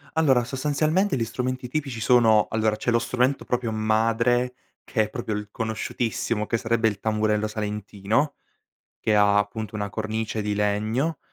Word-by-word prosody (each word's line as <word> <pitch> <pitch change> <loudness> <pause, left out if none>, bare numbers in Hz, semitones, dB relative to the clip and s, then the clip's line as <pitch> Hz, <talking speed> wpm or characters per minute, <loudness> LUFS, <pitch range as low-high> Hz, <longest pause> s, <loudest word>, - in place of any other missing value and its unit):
Allora 135 -6 +4
sostanzialmente 150 - 0
gli 120 - 0
strumenti 130 +2 -3
tipici 135 -3 -3
sono: 110 -2 +5
allora 110 -1 +1
c'è 115 - -3
lo 115 - +3
strumento 125 +3 0
proprio 120 -2 -1
madre 115 +3 +1 0.3
che 110 - +1
è 105 - -5
proprio 115 -3 -4
il 105 0 -5
conosciutissimo, 110 0 -2
che 115 - +1
sarebbe 115 0 +1
il 105 -3 -2
tamburello 110 0 +1
salentino, 105 +5 -2 0.6
che 110 - +1
ha 105 -1 +5
appunto 110 +1 -3
una 100 -1 -3
cornice 110 0 -3
di 105 0 -1
legno 110 +9 0
110 Hz, 155 wpm, -25 LUFS, 105-125 Hz, 0.6 s, sono